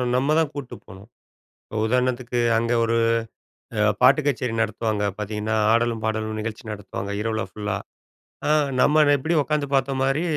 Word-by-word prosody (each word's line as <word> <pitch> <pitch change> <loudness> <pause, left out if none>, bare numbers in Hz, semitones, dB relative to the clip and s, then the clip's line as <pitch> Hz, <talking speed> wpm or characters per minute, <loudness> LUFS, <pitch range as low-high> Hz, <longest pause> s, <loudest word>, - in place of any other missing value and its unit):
ந - - -2
நம்ம 140 +4 +2
தான் 160 -3 +2
கூட்டு 140 -4 -7
போணும். 95 +4 -13 0.8
உதாரணத்துக்கு, 125 0 0 0.2
அங்க 115 +1 0
ஒரு 115 0 +1 0.8
அ - - +3 0.2
பாட்டு 135 +4 +6
கச்சேரி 130 -4 0
நடத்துவாங்க. 110 -1 -1
பார்த்தீங்கன்னா, 105 +1 -2 0.2
"ஆடலும் 115 -1 +1
பாடலும்" 110 0 -2
நிகழ்ச்சி 110 +2 -5
நடத்துவாங்க, 100 -1 -6
இரவுல 110 0 -1
ஃபுல்லா. 105 +1 -4 0.7
அ - - +2 0.3
நம்ம 155 +1 +4
அத 145 - +4
எப்படி 160 +6 -1
உட்காந்து 150 0 -1
பாத்த 135 0 +1
மாரி, 135 +4 +1
115 Hz, 150 wpm, -23 LUFS, 110-135 Hz, 0.8 s, பாட்டு